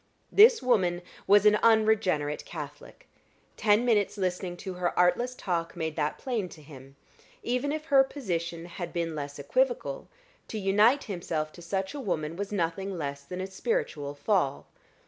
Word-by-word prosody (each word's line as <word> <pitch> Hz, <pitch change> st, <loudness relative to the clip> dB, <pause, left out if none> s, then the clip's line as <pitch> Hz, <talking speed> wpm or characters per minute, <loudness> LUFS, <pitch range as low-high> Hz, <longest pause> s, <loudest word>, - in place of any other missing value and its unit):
This 445 Hz, -, +7 dB
woman 180 Hz, -8 st, +2 dB, 0.2 s
was 205 Hz, +1 st, +6 dB
an 210 Hz, 0 st, +6 dB
unregenerate 215 Hz, -10 st, +2 dB
Catholic; 150 Hz, -3 st, -9 dB, 0.5 s
ten 210 Hz, +2 st, +3 dB
minutes' 215 Hz, -4 st, +2 dB
listening 180 Hz, -1 st, -2 dB
to 190 Hz, +1 st, -6 dB
her 180 Hz, -1 st, -2 dB
artless 210 Hz, +9 st, +2 dB
talk 170 Hz, -7 st, -3 dB
made 160 Hz, -2 st, -3 dB
that 150 Hz, -1 st, -1 dB
plain 230 Hz, -8 st, -3 dB
to 155 Hz, -, -13 dB
him: 135 Hz, -2 st, -13 dB, 0.5 s
even 250 Hz, +4 st, -1 dB
if 305 Hz, 0 st, -4 dB
her 275 Hz, -4 st, +6 dB
position 170 Hz, -, -4 dB
had 175 Hz, 0 st, -7 dB
been 170 Hz, -1 st, -2 dB
less 145 Hz, -1 st, -5 dB
equivocal, -, -, -1 dB, 0.4 s
to 220 Hz, -, -5 dB
unite 210 Hz, +7 st, +3 dB
himself 165 Hz, -6 st, -3 dB
to 175 Hz, -, -13 dB
such 190 Hz, +2 st, -3 dB
a 290 Hz, -, -5 dB
woman 165 Hz, -, -2 dB
was 200 Hz, +2 st, -4 dB
nothing 190 Hz, 0 st, -2 dB
less 140 Hz, -3 st, -4 dB
than 180 Hz, +6 st, -6 dB
a -, -, -2 dB
spiritual 190 Hz, -, -2 dB
fall. 145 Hz, -2 st, 0 dB
185 Hz, 160 wpm, -28 LUFS, 165-220 Hz, 0.5 s, This